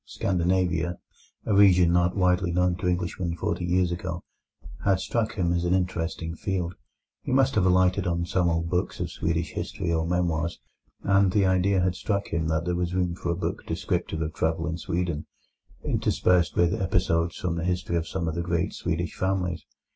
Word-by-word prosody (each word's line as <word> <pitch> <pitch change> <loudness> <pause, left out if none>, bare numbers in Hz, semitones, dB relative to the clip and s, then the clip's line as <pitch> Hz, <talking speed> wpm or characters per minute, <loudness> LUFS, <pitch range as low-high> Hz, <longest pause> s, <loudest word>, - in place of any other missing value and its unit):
Scandinavia, 90 -2 0 0.5
a 110 - +1
region 90 -4 +6
not 90 +2 +2
widely 90 -1 +2
known 90 0 +2
to 90 - -2
Englishmen 90 -1 -1
forty 85 +2 -2
years 90 0 +2
ago, 85 0 -4 0.6
had 95 -1 +3
struck 115 +2 -1
him 85 -4 +1
as 85 0 0
an 90 +1 +2
interesting 85 -2 -2
field. 90 -1 -2 0.5
He - - -5
must 135 0 +3
have 95 -3 +3
alighted 95 +1 +3
on 85 0 0
some 90 0 +1
old 80 0 0
books 90 +1 -1
of - - -3
Swedish 85 +1 -1
history 85 -2 -3
or 80 0 0
memoirs, 85 -1 0 0.4
and 95 -1 +4
the 100 0 +3
idea 95 +1 +3
had 90 0 +1
struck 100 +2 -2
him 80 -1 -1
that 80 +1 0
there 90 - 0
was 90 0 -1
room 90 -2 +1
for 85 - -5
a 85 - +1
book 90 - -3
descriptive 80 0 -2
of 80 - -4
travel 80 0 0
in 85 0 -3
Sweden, 85 -3 -2 0.6
interspersed 85 -3 +2
with 85 0 +3
episodes 85 -3 +1
from 90 -2 -2
the 85 - -3
history 90 -1 -1
of 85 -1 -1
some 85 -1 -3
of 80 - -1
the 85 - -2
great 85 +2 -1
Swedish 85 -1 -2
families. 90 -3 -1
90 Hz, 185 wpm, -26 LUFS, 85-95 Hz, 0.6 s, region